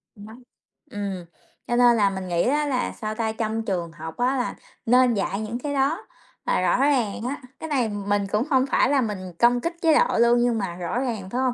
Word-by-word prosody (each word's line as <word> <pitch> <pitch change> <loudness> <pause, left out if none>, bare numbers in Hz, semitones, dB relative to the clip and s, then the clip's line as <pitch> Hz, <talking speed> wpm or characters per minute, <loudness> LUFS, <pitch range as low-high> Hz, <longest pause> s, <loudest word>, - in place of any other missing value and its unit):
Đó. 210 +2 -11 0.6
Ừm, 195 -3 -4 0.4
cho 240 - 0
nên 240 -1 +5
là 200 -2 +4
mình 190 -1 -5
nghĩ 170 -1 +1
á 295 +4 +1
là, 255 -3 -1
sao 215 -1 -5
ta, 220 -1 -1
trong 220 0 -3
trường 175 -5 -2
học 160 0 -9
á 255 +2 +1
là 250 - -2 0.3
nên 250 +1 +4
dạy 195 0 -2
những 220 +3 -4
cái 285 +2 -3
đó 285 +8 0 0.4
là - - +1
rõ - - +2
ràng 255 -6 +1
á. 260 +4 -4 0.2
Cái 320 - -6
này 255 -6 +1
mình 205 -1 -1
cũng 210 +2 +2
hông 260 -1 +4
phải - - +3
là 280 -1 +3
mình 190 -6 -4
công 240 +1 +4
kích 335 +5 -2
chế 325 -1 +4
độ - - +2
luôn, 235 +1 +5
nhưng 240 -1 +2
mà 195 -5 -3
rõ 180 +7 -3
ràng, 225 -8 -3
phải 245 +5 -2
hông? 255 -2 +1
230 Hz, 230 wpm, -24 LUFS, 200-255 Hz, 0.6 s, nên